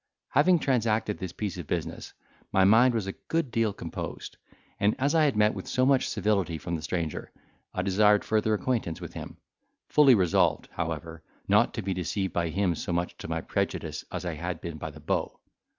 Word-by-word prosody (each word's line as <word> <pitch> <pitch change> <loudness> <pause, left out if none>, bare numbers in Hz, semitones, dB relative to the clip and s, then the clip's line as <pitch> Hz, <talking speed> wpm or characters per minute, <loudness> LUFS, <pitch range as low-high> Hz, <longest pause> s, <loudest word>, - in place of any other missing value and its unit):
Having 175 +6 +4
transacted 115 -7 0
this 95 -2 -4
piece 95 -2 -4
of 85 - -7
business, - - -4 0.4
my 95 - +4
mind 115 +5 +6
was 110 -4 -1
a 95 - -3
good 165 +4 -3
deal 115 -2 +1
composed; - - -6 0.4
and 100 +1 +3
as 140 +3 +1
I 160 -2 +4
had 135 -7 +1
met 105 0 +4
with - - -7
so 130 -1 +2
much 135 -1 +3
civility 100 -6 0
from 85 +2 -4
the 80 - -4
stranger, 80 -1 -3 0.4
I - - -2
desired 105 +2 +4
further 110 0 +2
acquaintance 105 -5 -1
with - - -8
him, - - -8 0.5
fully 140 -4 +6
resolved, 90 -5 +2
however, 80 0 -4 0.3
not - - +3
to - - -3
be 95 0 -1
deceived 95 +2 -2
by 85 -1 0
him 90 +1 +1
so 85 - -4
much 85 +1 -1
to - - -7
my - - -2
prejudice - - -2
as - - -4
I 85 - -2
had 85 +2 -4
been 85 -3 -6
by 80 - -4
the 75 0 -12
beau. 75 - -2
100 Hz, 200 wpm, -28 LUFS, 85-115 Hz, 0.5 s, mind